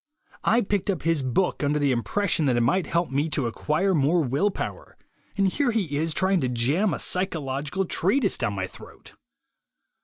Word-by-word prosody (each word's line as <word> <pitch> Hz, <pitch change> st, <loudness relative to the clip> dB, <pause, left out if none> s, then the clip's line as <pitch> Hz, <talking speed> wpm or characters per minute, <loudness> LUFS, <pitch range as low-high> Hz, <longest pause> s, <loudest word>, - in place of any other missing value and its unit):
I 230 Hz, +4 st, +3 dB
picked 205 Hz, -1 st, -1 dB
up 185 Hz, -5 st, -1 dB
his 165 Hz, -2 st, +1 dB
book 135 Hz, +7 st, 0 dB
under 145 Hz, +1 st, +1 dB
the 145 Hz, -2 st, +2 dB
impression 160 Hz, -, 0 dB
that 125 Hz, -2 st, +2 dB
it -, -, +2 dB
might 145 Hz, +10 st, +1 dB
help 170 Hz, -3 st, 0 dB
me 145 Hz, +4 st, 0 dB
to 145 Hz, -4 st, -1 dB
acquire 155 Hz, -, 0 dB
more 160 Hz, +2 st, +2 dB
will 140 Hz, +10 st, +1 dB
power, -, -, -6 dB, 0.4 s
and 195 Hz, -1 st, +3 dB
here 265 Hz, +8 st, 0 dB
he 200 Hz, -11 st, -1 dB
is 160 Hz, +2 st, -1 dB
trying 190 Hz, -2 st, +2 dB
to 130 Hz, -, 0 dB
jam 140 Hz, -, +1 dB
a -, -, -2 dB
psychological 160 Hz, -1 st, -1 dB
treatise 200 Hz, +6 st, +1 dB
down 120 Hz, -4 st, -1 dB
my 95 Hz, -1 st, -2 dB
throat." -, -, -14 dB
160 Hz, 185 wpm, -25 LUFS, 135-190 Hz, 0.4 s, I